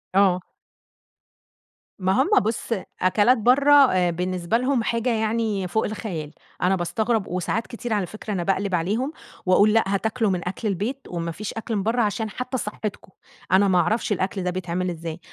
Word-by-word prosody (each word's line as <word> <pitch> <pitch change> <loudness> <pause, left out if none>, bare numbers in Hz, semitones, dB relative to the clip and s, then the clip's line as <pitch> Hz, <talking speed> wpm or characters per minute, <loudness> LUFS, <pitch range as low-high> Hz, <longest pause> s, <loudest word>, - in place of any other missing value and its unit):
آه. 190 -2 +4 1.6
ما 185 0 +1
هم 300 - +1
بُص، 220 +2 -3 0.3
أكلات 205 +7 +4
برا 275 +4 +6
آآ 180 -2 +2
بالنسبة 180 +4 -1
لهم 255 -1 +1
حاجة 230 +2 0
يعني 220 -3 0
فوق 220 +5 0
الخيال. 175 -8 -5 0.3
أنا 185 +2 +3
باستغرب، 215 +4 -1
وساعات 185 +5 -2
كتير 235 -1 -4
على 200 -3 +1
فكرة 215 +2 -6
أنا 175 -2 -1
باقلب 195 0 0
عليهم، 215 - -1 0.3
وأقول: 205 +4 +5
"لأ 225 - +4
هتاكلوا 220 +3 0
من 180 -1 -2
أكل 205 +4 -3
البيت، 210 +8 -2
ومافيش 170 +4 -4
أكل 225 0 -4
من 195 - -1
برا، 235 +2 +1
عشان 215 +1 -1
حتى 255 +4 -4
صحتكم." 210 -3 -5 0.4
أنا 195 +2 +5
ما 180 -2 +4
اعرفش 220 +5 0
الأكل 190 0 -1
ده 180 - 0
بيتعمل 180 0 -2
إزاي. 165 -1 -6
205 Hz, 165 wpm, -24 LUFS, 180-225 Hz, 1.6 s, برا